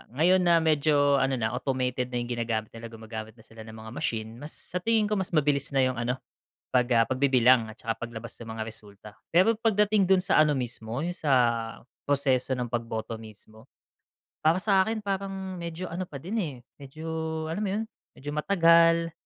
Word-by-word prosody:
ngayon 180 +6 +4
na 170 -2 +4
medyo 145 -2 +3
ano 135 0 +1
na 110 -3 -1
automated 125 0 -1
na 125 - -7
'yung 120 0 -2
ginagamit 115 -2 -2
nila, 115 0 -8
gumagamit 110 -1 -8
na 110 - -18
sila 115 0 -17
ng 110 - -10
mga 110 0 -10
machine, 115 -3 -4
mas 150 +2 -9
sa 180 - -5
tingin 225 +3 +2
ko 210 - +1
mas 185 -2 -3
mabilis 145 -2 +2
na 135 - +4
'yung 130 -2 0
ano 120 +1 -1 0.6
pag, 125 -1 +3
ah, 115 - +6
pagbibilang 130 -1 +3
at 110 - -10
saka 115 0 -4
paglabas 115 0 -8
ng 115 - -9
mga 110 - -3
resulta. 105 -2 -11 0.3
Pero 185 +6 +6
pagdating 210 -3 +2
dun 190 -1 +4
sa 180 - +3
ano 150 -1 +4
mismo, 120 0 -4
'yung 175 - -1
sa 150 -5 -1 0.8
proseso 135 -2 +1
ng 125 -2 -4
pagboto 115 -1 -3
mismo, 110 +1 -14 0.8
para 165 +4 +4
sa 190 -1 +3
akin 220 0 -2
parang 195 -2 -4
medyo 170 +1 -5
ano 180 +2 -4
pa 140 -6 -9
din, 195 +9 -4
eh, 160 -11 -2 0.2
medyo 145 +3 -10 0.4
alam 200 +6 -2
mo - - -1
'yun 215 +2 -1 0.3
medyo 145 +2 -7
matagal, 165 0 +4
135 Hz, 190 wpm, -27 LUFS, 115-170 Hz, 0.8 s, ah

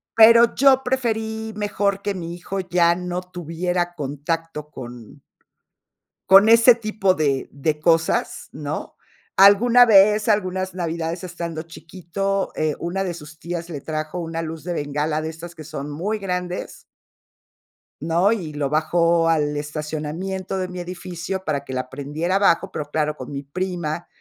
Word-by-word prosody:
Pero 230 +1 +7
yo 270 -1 +5
preferí 220 -3 -2
mejor 205 -1 -1
que 205 -1 -2
mi 170 -1 -5
hijo 190 +2 -5
ya 175 -1 +3
no 180 0 -3
tuviera 175 0 -3
contacto 150 +2 -4
con 120 -3 -10 1.1
con 195 +3 +8
ese 230 +1 +7
tipo 215 -4 0
de 140 -5 0
de 150 +2 -2
cosas, 165 0 +1
¿no? 150 0 -5 0.4
Alguna 230 +5 +7
vez, 210 0 +5
algunas 185 -2 0
navidades 170 0 -3
estando 170 -2 -5
chiquito, 190 +4 -3
eh, 155 -2 0
una 185 +3 -2
de 180 -2 -3
sus 155 -1 -12
tías 170 0 -5
le 145 -5 -6
trajo 155 +2 -4
una 165 -1 -4
luz 160 0 -6
de 175 0 -3
bengala 150 +1 -1
de 160 - -3
estas 165 +2 -9
que 155 - -9
son 150 -1 -6
muy 200 +9 -2
grandes 180 -2 -4 1.2
¿no? 170 +6 +2
Y 175 -9 -3
lo 145 -2 -2
bajó 165 +2 +2
al 150 -2 +1
estacionamiento 155 +6 -4
de 185 -1 -2
mi 180 0 -7
edificio 180 +1 -5
para 140 -2 -1
que 130 - -8
la 130 0 -3
prendiera 150 +7 -3
abajo, 195 -1 +3
pero 150 - -4
claro, 150 -1 0
con 130 0 -9
mi 140 0 -5
prima, 175 +1 -4
170 Hz, 150 wpm, -22 LUFS, 155-195 Hz, 1.2 s, con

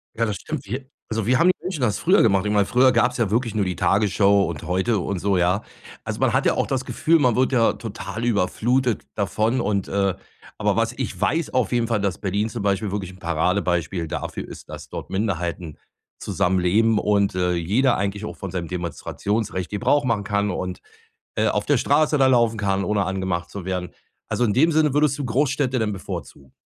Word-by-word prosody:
Ja, 115 - +1
das 105 -3 -2
stimmt 100 - -6
wir 130 +5 -5 0.2
also, 110 -2 -1
wie 125 +2 +3
haben 170 - +5
die 185 - +3
Menschen 180 -5 -4
das 110 -4 +1
früher 185 +4 +4
gemacht? 100 -3 +3
Ich 105 - 0
meine, 100 -1 +3
früher 130 +1 +4
gab 120 +1 +3
es - - -7
ja 115 -5 0
wirklich 115 0 0
nur 105 - +1
die 90 -2 -3
Tagesschau 100 +2 +3
und 80 -2 -4
heute 95 +6 0
und 90 0 -3
so, 100 -1 +1
ja? 90 +4 +2 0.4
Also, - - -4
man - - +2
hat - - +2
ja - - +4
auch - - 0
das - - -2
Gefühl, 165 +1 +2
man 125 -5 +3
wird 130 +2 +2
ja 115 -3 +4
total 115 +1 -6
überflutet 120 +4 +1
davon 110 +4 0
und 100 -2 -1
,äh 100 -1 +1 0.5
aber - - +2
was - - +1
ich - - -3
weiß 165 +1 0
auf 125 -6 +1
jeden 120 -1 +2
Fall, 115 -3 +1
dass 100 -3 -1
Berlin 100 +2 -1
zum 115 -3 -5
Beispiel 100 0 0
wirklich 95 -3 -3
'n 95 - -15
Paradebeispiel 85 0 0
dafür - - -5
ist, - - -11
dass - - -9
dort - - -6
Minderheiten 90 -5 -3 0.4
zusammenleben 95 +5 +2
und, 100 -2 +1
äh, 90 -1 +1
jeder 110 +10 +2
eigentlich 100 +2 -2
auch - - -7
von 95 - -6
seinem 85 -3 -4
Demonstrationsrecht 95 +3 -3
Gebrauch 130 +7 +1
machen 110 -4 0
kann 100 0 0
und, 90 0 -4 0.6
äh, - - +2
auf - - 0
der - - +3
Straße 155 -1 +2
da 135 - +4
laufen 115 -3 +3
kann, 100 -1 0
ohne 105 0 +1
angemacht 95 -2 -2
zu 100 -3 -7
werden. 90 -1 -3 0.4
Also, 120 - +1
in 105 - +1
dem 160 +8 +4
Sinne 155 -3 +2
würdest 145 -1 +2
du 145 - -3
Großstädte 130 +1 0
denn 110 -1 0
bevorzugen. 85 -8 -8
105 Hz, 210 wpm, -23 LUFS, 95-120 Hz, 0.6 s, haben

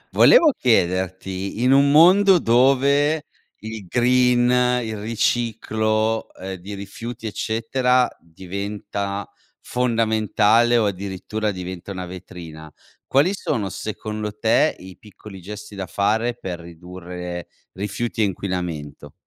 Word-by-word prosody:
Volevo 335 -11 +7
chiederti, 95 -1 0
in 130 - +4
un 140 +1 +5
mondo 185 +6 +6
dove 140 +4 +3 0.4
il 110 -3 -7
green, 125 +2 +3 0.4
il 110 -2 -5
riciclo, 110 0 0
ehm, 95 +1 -6
di 100 +3 -8
rifiuti, 115 +4 -8
eccetera, 125 +4 +1
diventa 100 +3 -5 0.3
fondamentale 115 -1 +2
o 115 - +2
addirittura 100 +2 -3
diventa 90 -1 -6
una 90 -1 -5
vetrina, 85 -4 -10 0.4
quali 145 +8 +3
sono 110 - -2
secondo 105 +2 -5
te 115 +8 +2
i 95 0 -12
piccoli 105 -1 -13
gesti 105 +3 -9
da 95 -2 -5
fare 110 +7 0
per 90 -6 -6
ridurre 90 +1 -8 0.2
rifiuti 105 +4 -3
e - - +4
inquinamento? 85 -7 -5
105 Hz, 110 wpm, -22 LUFS, 95-120 Hz, 0.4 s, Volevo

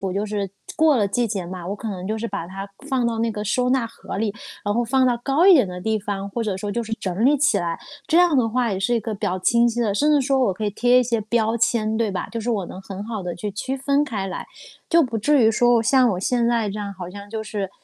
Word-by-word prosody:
就 205 +1 0
是 205 -2 -3 0.3
过 315 -4 +4
了 205 -3 +2
季 235 +4 0
节 200 -4 -3
嘛， 180 -1 -7
我 200 - -3
可 220 - -7
能 190 -2 -5
就 220 - -2
是 230 +1 -3
把 165 - -5
它 195 +2 -7 0.2
放 260 -3 +1
到 230 -1 -1
那 230 0 0
个 210 -1 -4
收 250 +4 +1
纳 255 -2 +2
盒 230 - -8
里， 210 -1 -1 0.3
然 205 - +1
后 240 +2 +1
放 260 +3 +2
到 245 -1 +3
高 285 +6 +3
一 390 - +9
点 265 - +5
的 180 0 -6
地 220 +3 -1
方， 200 -1 -4
或 235 - -2
者 205 -4 -2
说 205 +1 -4
就 235 +3 -1
是 225 - -8
整 195 0 -3
理 290 +3 +5
起 305 +4 +3
来。 170 -1 -2 0.3
这 330 - +3
样 350 -3 +5
的 240 -4 +2
话 240 0 0
也 190 - -3
是 235 +5 +1
一 - - +2
个 220 0 -4
比 200 - -3
较 185 - -1
清 235 +5 +3
晰 235 +1 -3
的， 220 -4 +1
甚 295 +9 +2
至 295 - +5
说 270 -1 +2
我 250 -6 +3
可 215 +3 -4
以 205 - -1
贴 245 +4 +4
一 250 - +2
些 230 -2 -1
标 220 +1 0
签， 220 -1 +1
对 225 -2 +1
吧， 190 - -3
就 230 - -4
是 235 - -3
我 205 -6 -1
能 185 +2 -9
很 195 0 -7
好 220 -2 -4
的 175 -2 -4
去 205 +4 -4
区 260 +7 -4
分 280 +2 +1
开 215 -9 -3
来。 185 - -5 0.4
就 335 -1 +5
不 235 -4 -3
至 265 +1 +4
于 220 - +5
说 240 +1 +3
像 255 0 +4
我 180 - -1
现 235 +4 +1
在 235 -2 +1
这 205 +2 -5
样， 200 -1 -4
好 180 -2 -7
像 200 +1 -10
就 220 0 -4
是 205 -3 -4
220 Hz, 315 characters per minute, -22 LUFS, 200-245 Hz, 0.4 s, 一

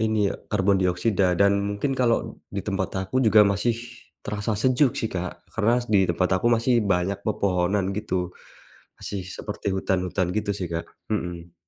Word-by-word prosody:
ini 110 -1 +1
ya, - - -7
karbon 100 -2 +2
dioksida 90 0 +2
dan 100 +2 +5 0.2
mungkin 100 +7 -1
kalau 125 -3 0
di 100 -1 -5
tempat 95 -2 -1 0.2
aku 130 +5 +1
juga 110 -3 +6
masih 100 +4 +1 0.5
terasa 105 0 -2
sejuk 130 +3 +2
sih, 110 - -2
Kak, 90 0 -5
karena 120 +3 +2
di 100 -4 +3
tempat 90 +1 +1
aku 120 - +2
masih 120 +1 +3
banyak 100 0 0
pepohonan 100 -1 0
gitu. 95 -4 -2 0.7
Masih 100 -2 -5
seperti 100 - -4
hutan-hutan 95 -1 0
gitu 110 -1 -1
sih, 90 - -2
Kak. 85 0 -4 0.2
Hmm. 85 -5 -4
100 Hz, 160 wpm, -25 LUFS, 90-110 Hz, 0.7 s, juga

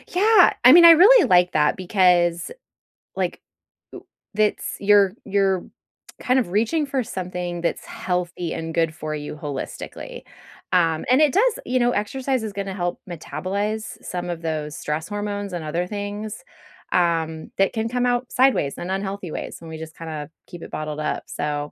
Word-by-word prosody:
Yeah. 415 0 +6
I 250 - +9
mean, 340 +2 +9
I 335 - +11
really 410 +10 +7
like 180 -1 +4
that 150 -1 +2
because, 180 -2 +2 0.7
like, - - -2 0.5
w - - -11 0.3
it's 215 -1 0
you're 200 -1 +4
you're 195 -2 +1 0.6
kind 255 +1 +2
of 230 - -2
reaching 230 - +1
for 265 -2 -1
something 180 -3 -5
that's 170 - -2
healthy 180 -2 -3
and 165 0 -5
good 165 -1 0
for 155 0 -5
you 150 0 -6
holistically, 145 -3 -7 0.5
um, 165 -3 +2
and 260 - +5
it 295 -3 +4
does 450 +4 +2
you 255 0 0
know, 240 0 +3
exercise 255 +4 -2
is 215 - -5
gonna 195 -1 -4
help 175 -2 -3
metabolize 195 +7 -4
some 180 0 -5
of 170 -1 -4
those 155 -2 -4
stress 150 +2 -3
hormones 205 -1 -4
and 170 -3 -4
other 170 +4 -2
things, 205 - -6 0.5
um, 165 -2 0
that 195 - +2
can 225 0 -2
come 250 +1 0
out 245 0 0
sideways 255 - +2
and 175 - -6
unhealthy 195 -3 -4
ways - - -6
when 165 - -12
we 160 - -7
just 160 0 -10
kinda 155 -2 -6 0.2
keep 175 -1 -10
it - - -10
bottled 155 0 -4
up. - - -2
So, 145 0 -3
185 Hz, 170 wpm, -22 LUFS, 165-220 Hz, 0.7 s, I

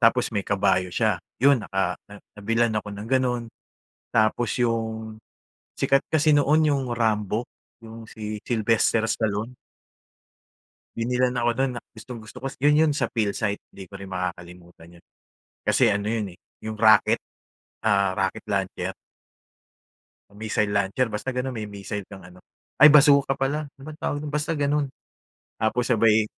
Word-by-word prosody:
tapos 120 +1 +3
may 100 - +1
kabayo 95 -2 +1
siya. - - +1 0.2
'Yun 135 -3 +5
naka 95 -2 -1
na 105 - -10 0.2
nabilhan 115 +2 +1
ako 105 - -7
ng 105 +2 -7
gano'n, 125 -2 +1 0.7
tapos 110 +1 +1
'yung 110 -2 -2 0.6
sikat 135 0 +2
kasi 155 0 +3
noon 145 +2 +4
'yung 140 -2 +1
Rambo, 110 0 0 0.4
'yung 115 0 -10
si 105 -1 -6
Sylvester 115 -1 +2
Stallone. 110 +2 -2 1.4
Binilhan 125 +2 0
ako 120 -1 +1
no'n, 135 -1 +1
na 120 - -5
gustong-gusto 110 0 -10
ko. 135 - -6 0.2
'Yun, 150 0 +5
'yun 150 - +2
sa - - -1
Philsite, 105 -2 -1
'di 95 -2 -12
ko 100 - -9
rin 100 - -8
makakalimutan 90 -2 -7
'yun. - - -23 0.6
Kasi - - +3
ano 100 +1 -2
'yun, 105 -5 -3
eh, - - -26 0.3
'yung 110 - -3
rocket 110 0 +4 0.6
ah, 100 -2 +3
rocket 95 -1 -1
launcher. 95 -2 -2 1.4
Missile 105 0 -1
launcher, 100 +5 +1
basta 105 +5 -3
gano'n. 125 +1 -2
May 110 -3 -5
missile 100 0 -6
kang 95 -2 -11
ano, 90 0 -15 0.4
ay, 150 - +11
basuka 140 -2 +5
pala, 145 +3 -2
ano 135 -1 -20
bang 155 +1 -9
tawag 145 - -2
do'n, 150 - -6
basta 150 +2 -1
ganon. 145 0 0 0.7
Tapos 110 +3 +1
sabay 110 -2 +4
110 Hz, 150 wpm, -24 LUFS, 100-130 Hz, 1.4 s, ay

